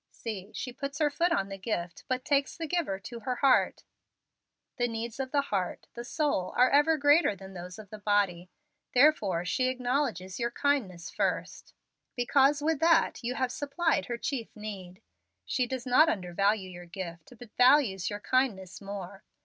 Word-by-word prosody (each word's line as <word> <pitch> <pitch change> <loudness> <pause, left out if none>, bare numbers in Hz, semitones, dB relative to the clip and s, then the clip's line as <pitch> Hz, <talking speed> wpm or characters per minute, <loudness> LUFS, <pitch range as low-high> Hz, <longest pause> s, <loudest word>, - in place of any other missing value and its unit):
See, 210 -3 -7
she 250 - -5
puts 275 +1 -5
her 300 -2 +2
foot 340 +4 +1
on 195 -9 0
the 195 0 -7
gift, 175 -4 -4
but 255 0 -2
takes 280 -1 +1
the 330 - -3
giver 315 - -1
to 235 +2 -8
her 250 +1 -2
heart. 270 0 +3 0.9
The 245 -1 +1
needs 230 +1 -5
of 265 -1 -2
the 285 - +3
heart 195 -9 -3
the 235 - -6
soul 280 - -1
are 250 +1 +5
ever 295 +3 +4
greater 290 -5 +4
than 190 0 -11
those 180 0 -8
of 210 -3 -12
the 215 - -8
body, 200 -4 +1 0.5
therefore 220 - +4
she 255 +7 +1
acknowledges 250 -7 -1
your 235 0 0
kindness 235 -10 -1
first, - - -3 0.4
because 275 +4 +3
with 320 -1 +1
that 330 -4 +3
you 245 +2 -2
have 255 -2 -1
supplied 290 +3 0
her 240 - -3
chief 240 -2 -4
need. 200 -2 -8 0.4
She 250 -2 0
does 255 -1 -4
not 280 +6 +5
undervalue 195 +2 0
your 175 0 -10
gift, 170 +1 -8
but 225 -1 -14
values 250 -8 +4
your 205 0 -5
kindness 210 -9 0
more. 195 -1 -7
235 Hz, 175 wpm, -29 LUFS, 195-275 Hz, 0.9 s, are